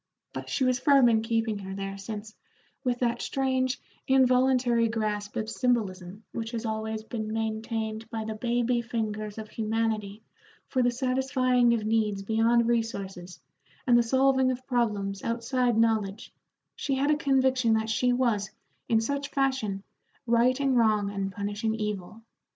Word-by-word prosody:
But - - -6
she 265 - 0
was 255 0 +2
firm 275 -3 +5
in 220 -1 +3
keeping 225 -2 -1
her 190 -1 -6
there, 195 0 -4
since, 210 +2 -7 0.5
with 250 -2 0
that 240 -1 0
strange, 260 -1 0 0.3
involuntary 255 -2 +4
grasp 210 -2 -2
of 220 - -2
symbolism 205 -5 -1
which 225 -1 -4
has 230 0 -3
always 220 0 -3
been 220 -1 -5
maintained 220 0 -3
by 225 -2 -4
the 220 - -3
baby 240 +2 0
fingers 215 -3 -4
of 215 -1 -7
humanity 220 -2 -2 0.4
for 255 - 0
the 245 - +3
satisfying 255 -1 +2
of 215 -2 -3
needs 215 -3 0
beyond 230 +2 +3
resources 195 -6 -3 0.5
and 245 - +5
the 240 - +6
solving 265 +2 +3
of 255 0 -3
problems 210 -6 -1
outside 240 0 0
knowledge, 220 -2 0 0.4
she 275 - -1
had 280 +3 +2
a - - +4
conviction 265 -5 +2
that 220 0 -1
she 250 +3 +2
was, 235 -5 +1 0.4
in 225 -2 +3
such 280 +4 -2
fashion, 260 -8 -1 0.4
righting 255 +3 +3
wrong 215 -4 +3
and 195 -1 -3
punishing 205 +3 -2
evil. 210 0 -5
225 Hz, 150 wpm, -27 LUFS, 215-250 Hz, 0.5 s, the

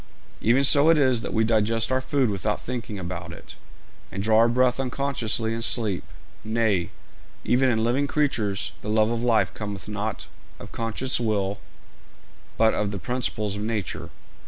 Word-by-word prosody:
Even 125 +5 +3
so 145 +3 +6
is 135 -7 +4
it - - -7
that - - -5
we 110 - +2
digest 115 +1 +1
our 130 0 +1
food 130 -3 +1
without 105 +2 -2
thinking 120 -4 -5
about 85 -2 -6
it, - - -11 0.6
and 100 +1 -4
draw 110 +1 +4
our 115 +1 +5
breath 125 +1 +2
unconsciously 125 -4 -1
in 115 - -3
sleep; 110 -5 0 0.4
nay, 110 -5 0 0.6
even 130 +1 +3
in 110 -2 +1
living 130 +5 +1
creatures 110 -10 -1
the 105 - -6
love 110 +1 +3
of 115 -1 -2
life 110 -6 +2
cometh 100 -2 -6
not 105 0 -4 0.3
of - - -11
conscious 115 +3 -1
will, 105 -4 -1 1.0
but 110 0 +4
from 105 - -1
the 100 - -4
principles 110 -2 -2
of 105 - -5
nature. 105 -5 -3
115 Hz, 165 wpm, -25 LUFS, 105-125 Hz, 1.0 s, so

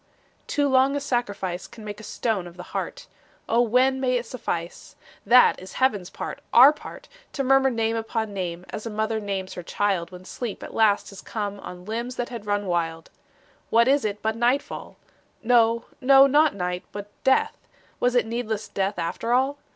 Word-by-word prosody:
Too 290 -1 +1
long 265 +1 +3
a - - 0
sacrifice 205 -9 -2
Can 220 - -12
make 210 0 -6
a - - -11
stone 210 -5 -2
of 175 +1 -13
the 180 - -7
heart. - - -4 0.4
O 235 +1 +3
when 255 +3 +3
may 255 -1 +1
it 240 - -4
suffice? 175 -8 -5 0.3
That 250 -3 +6
is 185 - -10
heaven's 205 -8 +1
part, - - -6
our 265 +5 +8
part 300 - -11 0.3
To 275 - -1
murmur 270 0 +4
name 225 -2 0
upon 225 -1 -3
name, 180 -2 -4
As 215 +1 -5
a - - -3
mother 220 +1 -1
names 195 -2 -4
her 180 - -6
child 185 -1 -1
When 180 0 -11
sleep 230 +3 -6
at - - -9
last 210 -2 +2
has 195 - -10
come 205 -2 -4
On 180 -1 -9
limbs 235 +4 -4
that 245 -1 -3
had 230 -4 -8
run 205 0 0
wild. 165 -2 -2 0.6
What 235 +1 +4
is 275 +1 +3
it 210 -1 -3
but 220 0 0
nightfall? 245 +4 -1 0.5
No, 230 -1 +3 0.2
no, 270 +1 +7
not 295 +1 +4
night 180 0 -3
but 205 0 -8
death; 265 0 +3 0.4
Was 245 0 +1
it 245 - +3
needless 225 -2 -3
death 195 0 -2
after 175 +7 -2
all? 270 +3 +1
225 Hz, 190 wpm, -24 LUFS, 195-250 Hz, 0.6 s, our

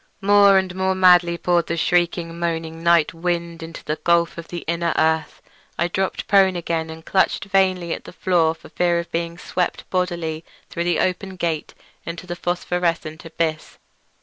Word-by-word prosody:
More 200 -1 +6
and 190 -1 0
more 190 0 0
madly 180 -2 +5
poured 175 -1 +1
the 170 - -2
shrieking, 170 0 0
moaning 165 -1 -3
night 170 -2 +3
wind 170 0 -3
into 165 0 -9
that 155 - -4
gulf 170 -1 +2
of 170 -1 -8
the 175 - -6
inner 170 0 0
earth. 160 -1 0 0.3
I 175 - 0
dropped 190 +2 -2
prone 190 -2 +4
again 165 -2 -2
and 160 0 -10
clutched 190 0 +1
vainly 185 -3 +1
at - - -7
the - - -9
floor 170 -3 +1
for - - -15
fear 175 -1 +1
of 170 0 -4
being 170 0 -3
swept 180 0 -3
bodily 170 -3 -2 0.3
through 170 - -2
the 175 - +1
open 190 +1 -1
gate 165 -3 -3 0.3
into 170 +1 -7
the 175 -1 -5
phosphorescent 175 -2 -2
abyss. 160 -1 -3
170 Hz, 175 wpm, -22 LUFS, 165-180 Hz, 0.3 s, More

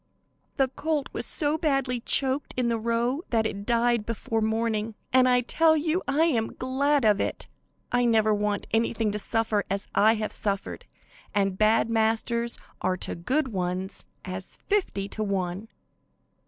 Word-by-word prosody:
The 270 -2 +3
colt 300 +1 -2
was - - -1
so 305 0 +2
badly 275 -5 0
choked 265 +3 0
in 245 -2 +1
the 230 -1 0
row 235 +5 0
that 225 -2 +1
it 200 -1 -4
died 235 -1 +2
before 225 0 -2
morning, 220 0 -1 0.2
and 255 0 +5
I 250 0 +4
tell 315 +6 +3
you 320 +4 0
I 285 +3 +3
am 240 -9 0
glad 275 +1 +1
of 210 -2 +4
it. - - -3 0.4
I 245 0 +2
never 220 -2 +3
want 210 0 -1
anything 225 -1 +1
to 210 - -3
suffer 220 -1 0
as 195 +1 -2
I 220 +2 +5
have 215 -1 -3
suffered, 200 -1 -3 0.5
and 195 -2 +1
bad 215 +3 +3
masters 230 +1 0 0.2
are 185 - 0
to - - -4
good 260 - -1
ones 185 -1 -3 0.2
as 185 0 -6
fifty 355 - 0
to 215 - -4
one. 195 0 -2
225 Hz, 160 wpm, -26 LUFS, 210-260 Hz, 0.5 s, and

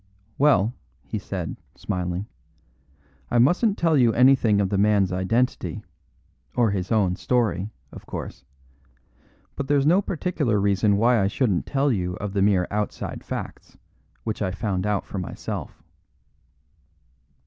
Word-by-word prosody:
"Well," 120 -6 +4 0.3
he - - -4
said, - - -5 0.2
smiling, 90 +1 -3 1.0
"I 120 - +1
mustn't 180 - +3
tell 165 -2 +2
you 120 -5 +4
anything 125 -4 +4
of 100 -2 +1
the 100 - 0
man's 100 -2 +3
identity, 115 +8 -1 0.7
or 115 -4 +3
his 95 0 -3
own 100 -5 +2
story, 105 -4 0 0.2
of - - -12
course; 65 - -7 1.1
but 140 - -4
there's 145 -1 +2
no 175 +6 +5
particular 150 - -1
reason 100 +1 +2
why 115 +1 +3
I 95 - +2
shouldn't 100 -3 0
tell 140 0 +1
you 90 -5 -1
of 100 0 -5
the 100 - +1
mere 95 -3 +3
outside 105 0 -3
facts - - -7 0.5
which 110 -1 -4
I 95 - 0
found 95 0 -2
out 105 -1 0
for 100 - -5
myself." 90 - -6
105 Hz, 135 wpm, -24 LUFS, 95-125 Hz, 1.1 s, no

